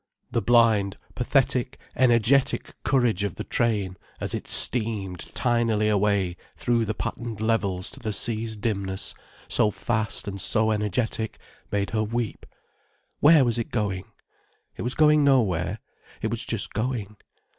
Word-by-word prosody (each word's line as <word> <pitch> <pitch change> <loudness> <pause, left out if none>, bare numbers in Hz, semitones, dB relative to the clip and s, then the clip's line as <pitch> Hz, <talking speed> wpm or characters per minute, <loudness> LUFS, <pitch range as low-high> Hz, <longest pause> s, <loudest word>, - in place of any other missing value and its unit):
The 115 - +1
blind, 110 -3 +3 0.2
pathetic, 130 0 +1 0.2
energetic 130 +1 +3
courage 120 -7 +2
of 100 -4 -2
the - - -5
train 100 -6 -1 0.2
as - - -3
it - - -4
steamed 105 -7 +2 0.2
tinily 115 -3 +2
away 100 -3 +1 0.2
through 120 -2 +1
the 110 0 -3
patterned 115 -3 -5
levels 100 -5 0
to - - -11
the 110 -4 -3
sea's 110 +1 -2
dimness, 100 -3 -1 0.3
so 105 - +2
fast 105 +2 -2
and 100 -1 -4
so 110 +3 +2
energetic, 110 +1 -1 0.3
made 100 -1 -1
her 110 - 0
weep. 115 +1 -3 0.7
Where 150 -2 +6
was 120 -1 +1
it 115 - -3
going? 100 -4 -2 0.7
It - - -7
was 125 +2 -2
going 150 -1 +5
nowhere, 105 - +2 0.4
it - - -2
was - - -1
just - - -3
going. 110 -2 -3
110 Hz, 140 wpm, -25 LUFS, 100-120 Hz, 0.7 s, Where